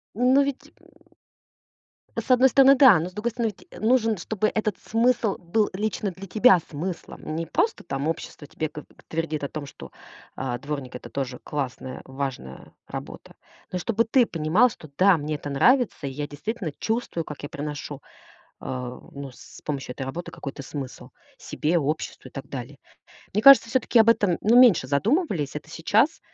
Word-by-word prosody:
Ну 255 +4 +4
ведь 280 -1 -5
м - - -22 1.3
С - - -5
одной 255 +1 +6
стороны- 270 +1 +7
да, 255 - +7
но 175 +3 -3
с - - -20
другой 215 +4 -2
стороны, 225 -2 -2
ведь - - -14
нужен, 225 -1 +3
чтобы 215 +3 -1
этот 215 -3 -1
смысл 230 -2 +1
был 205 +5 0
лично 205 0 -2
для 195 +2 -10
тебя 215 -1 +5
смыслом. 160 0 -6
Не 165 -1 -3
просто 445 - 0
там 140 -3 -3
общество 160 -2 -5
тебе 155 +2 -4
го 150 - -9 0.2
твердит 160 -2 -3
о 140 - 0
том, 155 -2 -6
что, 140 - -11 0.5
э, 125 -2 -3
дворник- 140 -3 -5
это 125 - -9
тоже 130 -2 -4
классная, 130 -3 -5
важная 130 - -6 0.2
работа. - - -8 0.4
Но 185 - -2
и - - -3
чтобы 230 +5 +1
ты 235 +1 +3
понимал, 165 +10 +3
что 155 -8 -12
"да, 190 +2 +5
мне 150 0 -3
это 145 0 -6
нравится, 240 - +3
и 135 - -3
я 145 +2 -4
действительно 180 - -5
чувствую, 220 -7 -2
как 150 - -8
я 145 - -6
проношу, 145 -1 -6 0.6
э, - - -11 0.5
ну, 140 -1 -8
с - - -14
помощью 135 -4 -4
этой 135 - -5
работы 165 +6 -6
какой-то 140 0 -7
смысл 135 -1 -7 0.3
себе, 165 +3 -1
обществу 150 +1 -3
и - - -32
так 135 - -8
далее". 135 +1 -7 0.6
Мне 210 - 0
кажется, 275 -3 +9
всё-таки 245 0 +3
об 220 - +5
этом, 205 -6 +3
ну, 230 +4 +5
меньше 220 - +6
задумывались. 180 - 0
Это 150 +1 -7
сейчас, 215 - +2
170 Hz, 180 wpm, -25 LUFS, 145-225 Hz, 1.3 s, кажется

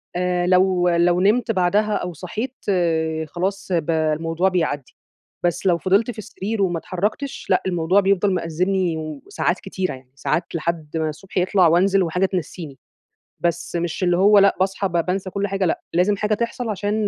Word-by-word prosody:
آآ 180 0 0
لو 185 -1 +3
لو 175 +1 +3
نِمت 225 +4 +3
بعدها 205 +2 +2
أو 180 0 -3
صحيت 215 - -5 0.7
خلاص 190 +5 -3
ب 165 -2 +1
الموضوع 165 +3 +1
بيعدّي. 155 -7 -2 0.5
بس 175 +2 0
لو 175 -3 +4
فضلْت 195 +7 +2
في 230 - -14
السرير 215 0 -4
وما 175 -3 +1
اتحركْتش 210 - -3
لأ، - - +3
الموضوع 180 +1 +2
بيفضل 195 0 +2
مأزمني 180 0 0
وساعات 155 +3 -3
كتيرة 190 -3 -3
يعني، 130 -1 -14
ساعات 170 +5 -2
لحد 165 -1 -3
ما 160 -1 0
الصبح 185 +6 -9
يطلع 185 0 +4
وأنزل 190 +4 +3
وحاجة 180 +3 +1
تنسّيني. 175 -6 -5 0.6
بس 170 0 -2
مش 170 +1 -2
اللي 175 -1 +3
هو 205 +2 +6
لأ، 200 0 +5
باصحى 195 +1 0
ب - - -12
بانسى 185 +1 -2
كل 200 +2 -2
حاجة 195 -1 -1
لأ، 170 - 0
لازم 180 +4 +3
حاجة 210 +1 0
تحصل 235 +2 -2
عشان 210 +1 -1
180 Hz, 170 wpm, -21 LUFS, 170-195 Hz, 0.7 s, هو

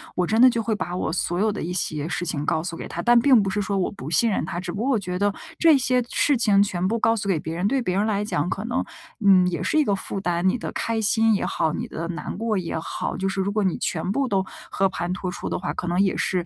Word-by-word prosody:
我 180 -1 0
真 220 +2 +2
的 255 - +9
就 230 -2 -1
会 220 0 -1
把 180 -3 -4
我 160 - -2
所 175 0 -1
有 215 +2 +2
的 205 - -5
一 175 - -3
些 155 -4 -2
事 180 0 -2
情 150 -4 -2
告 160 - +1
诉 175 -1 -4
给 - - -7
他， 170 - -5
但 240 +5 +5
并 250 -2 +5
不 195 - -1
是 205 +2 -1
说 200 0 -1
我 185 - 0
不 150 -7 -8
信 225 +8 +3
任 195 - 0
他。 175 - -4
只 185 - -5
不 200 - -4
过 260 - 0
我 225 - +2
觉 180 -2 -4
得 205 +1 +1 0.2
这 325 -3 +6
些 250 -1 +1
事 290 - +2
情 210 -5 +3
全 185 -3 0
部 225 +4 0
告 225 +1 +3
诉 200 -2 -3
给 175 -5 +2
别 160 +2 -5
人， 180 +4 0
对 265 +3 +1
别 185 -5 -1
人 200 +2 +2
来 210 -1 0
讲 175 -4 -1
可 205 +3 -3
能 240 - -1 0.4
嗯 185 -2 +6
也 175 -1 -2
是 310 - +1
一 310 - +5
个 205 -8 +1
负 195 0 -5
担， 175 -1 0
你 250 - 0
的 - - -5
开 230 -1 -1
心 225 +1 +3
也 - - -1
好， 160 -2 0
你 - - -4
的 165 +1 -5
难 175 - -5
过 225 -1 -1
也 170 -4 -3
好， 160 - -4
就 190 0 -1
是 195 - -3
如 195 +1 -1
果 210 0 0
你 185 -3 0
全 175 +3 -2
部 270 +5 0
都 195 -5 +1 0.3
和 195 0 +1
盘 180 -1 -3
托 185 -1 -4
出 - - -6
的 - - -2
话， 180 - -3
可 175 - -5
能 175 +2 +1
也 195 -2 +1
是 180 -2 0
195 Hz, 325 characters per minute, -23 LUFS, 175-220 Hz, 0.4 s, 的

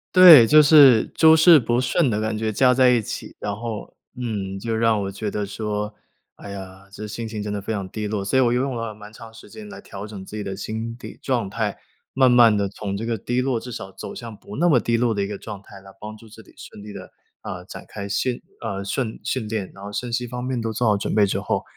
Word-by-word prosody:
对， 165 -10 +10
就 155 +3 +7
是 140 -6 +7
诸 160 0 +7
事 160 -1 +7
不 120 0 0
顺 135 +3 +1
的 105 0 -1
感 110 0 -2
觉 110 0 -2
加 125 +4 +4
在 130 0 +5
一 120 -2 +3
起。 105 - -7
然 100 -1 -3
后 115 -1 -6 0.2
嗯， 105 -6 -4
就 115 +2 -3
让 110 -2 +2
我 95 - -4
觉 105 +2 -4
得 105 0 -3
说， 105 +1 -4 0.4
哎 100 - -11
呀， 95 0 -10
这 105 +2 -8
心 110 +2 -6
情 110 -2 -5
真 105 - -4
的 100 - -3
非 110 - -4
常 100 -3 -4
低 105 +1 -4
落。 105 -1 -3
所 100 +7 0
以 - - +5
我 120 -1 +2
又 125 - +1
用 135 -2 -2
了 115 -2 -5
蛮 105 0 -12
长 110 0 -13
时 115 - -14
间 215 -1 -11
来 200 - -10
调 100 +1 -9
整 100 -3 -9
自 105 - -10
己 105 - -4
的 95 -1 -5
心理 115 +4 -7
状 120 -7 -1
态。 105 -1 -3 0.4
慢 130 -2 +6
慢 115 -3 +6
地 100 -1 0
从 100 0 -5
这 115 - -5
个 115 -1 -1
低 120 +4 -2
落 125 -3 -1
至 125 - -9
少 95 -3 -7
走 - - -9
向 115 -2 -8
不 105 - -11
那 175 +4 +2
么 145 -7 +4
低 115 0 0
落 120 -1 +1
的 100 - -2
一 100 - -1
个 100 -1 -6
状 105 -3 -9
态， 100 -1 -14
来 95 - -14
帮 110 +1 -8
助 115 - -16
自 110 +1 -14
己 - - -20
顺 105 - -12
利 105 - -9
地 100 -2 -10 0.3
啊， - - -7
展 - - -11
开 100 -1 -7
训 120 +4 -1 0.2
啊， 100 -4 -4
顺 110 +2 -3
训 125 -5 -3
练。 105 -3 -4
然 100 - -12
后 100 - -7
身 120 +3 -4
心 120 +1 -2
方 125 +1 -6
面 130 -1 -2
都 115 -1 -3
做 120 +1 0
好 105 - +3
准 100 - -3
备 105 -2 +4
之 - - -1
后， - - -2
110 Hz, 290 characters per minute, -22 LUFS, 100-120 Hz, 0.4 s, 对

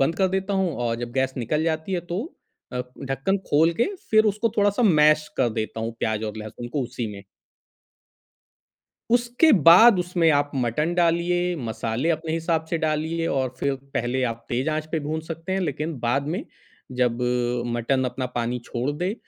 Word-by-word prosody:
बंद 160 +5 +2
कर 190 -1 +2
देता 190 +1 -1
हूँ 190 -5 0
और 115 0 -1
जब 120 0 -5
गैस 130 0 0
निकल 150 +6 0
जाती 160 +3 -2
है 180 - 0
तो 190 - -1 0.5
अ, 125 - -2 0.2
ढक्कन 135 +9 -1
खोल 160 +3 +4
के - - +6 0.3
फ़िर 220 0 +5
उसको 215 +3 0
थोड़ा-सा 205 +3 +2
मैश 155 -6 +5
कर 120 - +3
देता 110 0 -4
हूँ 115 +1 -3
प्याज़ 110 0 -1
और 105 0 -5
लहसुन 110 +3 -7
को 145 - 0
उसी 120 -1 -4
में। 100 - -9 1.9
उसके 245 +6 +3 0.2
बाद 185 +4 +9
उसमें 175 -2 +2
आप 145 0 -1
मटन 135 +7 0
डालिए, 175 +1 +1
मसाले 115 +1 -2
अपने 160 0 -3
हिसाब 165 -1 0
से 170 - 0
डालिए 160 +1 -1
और 130 -2 0
फ़िर 140 -1 0 0.2
पहले 130 +2 0
आप 115 0 -11
तेज़ 125 +5 0
आँच 155 0 -2
पे 160 - 0
भून 155 +2 -3
सकते 165 +2 -5
हैं। 190 - +1
लेक़िन 155 0 -2
बाद 135 +5 0
में 230 - -4 0.6
जब 125 0 +1 0.5
मटन 130 +3 0
अपना 125 +1 -3
पानी 120 +1 -1
छोड़ 125 +3 -2
दे 180 +4 -1
155 Hz, 180 wpm, -24 LUFS, 125-175 Hz, 1.9 s, बाद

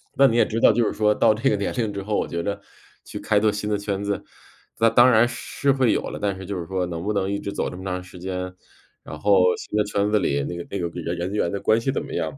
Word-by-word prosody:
那 140 - +6
你 115 -2 +1
也 - - +5
知 115 +1 -2
道， - - +7
就 120 - +2
是 - - -1
说 105 -1 +2
到 110 - +4
这 110 - +1
个 105 - +2
年 100 - -2
龄 110 -4 -1
之 100 - -4
后， 105 +1 -1
我 - - -1
觉 85 0 -3
得 100 0 -3 0.4
去 - - -7
开 105 - +2
拓 105 0 +3
新 105 +1 -4
的 105 - +1
圈 100 -1 -3
子， 100 0 -2 0.6
那 115 - +5
当 120 +2 +6
然 115 +1 +5
是 140 +3 -1
会 130 -4 +2
有 - - 0
了， - - -6
但 100 -2 0
是 95 - -8
就 95 -1 -4
是 85 - -5
说 95 -1 -1
能 85 -1 -5
不 105 - -1
能 100 -1 0
一 100 - -1
直 100 - -5
走 - - -2
这 - - -9
么 95 - -9
长 90 -1 -3
时 90 0 -13
间。 90 0 -5 0.5
然 - - -8
后 95 -3 +4
新 105 - -5
的 105 - +3
圈 100 0 0
子 105 - +3
里 70 -6 0
那 85 - -5
个 85 - -6
那 100 - -3
个 85 - -2
人 85 +2 -3
人 90 +3 -3
员 105 -5 0
的 100 - -3
关 110 +1 +3
系 135 - 0
怎 - - -2
么 - - -10
样， 80 -4 -3
100 Hz, 330 characters per minute, -23 LUFS, 90-110 Hz, 0.6 s, 道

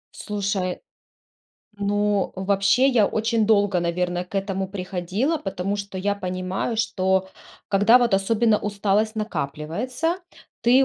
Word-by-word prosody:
Слушай. 200 -3 -2 1.0
Ну, 205 0 +1
вообще, 200 +7 +3
я 230 -6 +4
очень 220 -1 0
долго, 205 -4 +3
наверно, 175 +1 -1
к 180 - -19
этому 195 -1 -1
приходила, 195 - -2
потому 195 -1 -3
что 200 -1 -6
я 200 +2 0
понимаю, 185 +4 -3
что, 190 -4 +1 0.4
когда 205 +5 +5
вот 240 -4 +2
особенно 215 +2 +2
усталость 210 +1 0
накапливается, 215 - -2 0.4
ты 255 +3 +5
200 Hz, 115 wpm, -23 LUFS, 190-220 Hz, 1.0 s, когда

